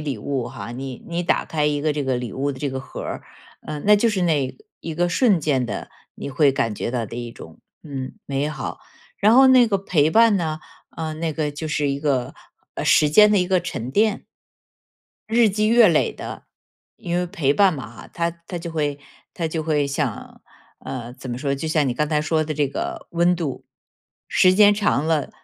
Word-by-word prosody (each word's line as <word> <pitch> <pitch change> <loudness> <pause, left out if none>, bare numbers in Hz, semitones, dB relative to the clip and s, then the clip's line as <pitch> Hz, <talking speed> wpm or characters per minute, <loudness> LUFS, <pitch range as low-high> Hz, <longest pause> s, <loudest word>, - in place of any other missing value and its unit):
礼 140 -7 -3
物 130 +1 -3
哈， 120 -1 -8
你 130 +1 -7
你 170 +1 -2
打 175 - +1
开 150 -2 -1
一 145 -1 0
个 155 0 +1
这 145 -2 -2
个 130 -1 0
礼 120 -4 -5
物 140 +2 -2
的 130 - -10
这 140 0 -2
个 130 - -4
盒 135 - -8
儿， - - -5 0.4
嗯， 150 -1 -5
那 210 - +7
就 230 +3 +2
是 205 -4 0
那 150 -6 +1 0.3
一 165 - -5
个 175 +2 +1
瞬 195 0 +3
间 135 -5 0
的、 100 -3 -5 0.3
你 140 - -6
会 145 0 +3
感 115 -5 -1
觉 120 - -3
到 115 -3 -2
的 115 - -8
一 120 -1 -6
种， - - -13 0.2
嗯， 135 -4 -6
美 140 +2 -1
好。 155 - -5 0.4
然 215 +3 +5
后 265 +1 +7
那 255 -2 +6
个 200 -3 0
陪 160 -5 +2
伴 225 +1 +5
呢， 160 -3 -2 0.4
呃， 160 -1 -3
那 160 0 -2
个 150 -1 -2
就 145 +2 -6
是 150 -1 0
一 140 0 -1
个， 140 -4 -1 0.4
呃， - - -4
时 150 - +4
间 210 +6 +7
的 205 - +4
一 180 0 0
个 185 - +3
沉 130 -8 -5
淀。 210 +6 +1 1.0
日 225 -1 +4
积 215 +2 +1
月 230 -2 +6
累 160 -3 +2
的。 - - -8 0.5
因 175 -4 -3
为 180 0 0
陪 145 -5 0
伴 200 -2 +4
嘛 140 -6 -6
哈， 110 -2 -13
它 170 0 0 0.2
它 175 - -4
就 170 0 -7
会 145 -3 -1 0.3
它 165 - -3
就 160 0 -3
会 150 -2 +1
像 140 -5 -4 0.4
呃， 120 -2 -6
怎 130 -1 -8
么 120 - -4
说， 140 +1 -1
就 155 +4 -4
像 155 -3 +2
你 125 - -1
刚 150 +4 0
才 150 -1 +1
说 155 +1 +1
的 155 - -3
这 145 0 +1
个 140 - -5
温 175 +1 +2
度。 155 -6 -4 0.7
时 185 - +5
间 205 +1 +6
长 200 -8 +1
了， 160 -3 0
155 Hz, 235 characters per minute, -22 LUFS, 135-175 Hz, 1.0 s, 那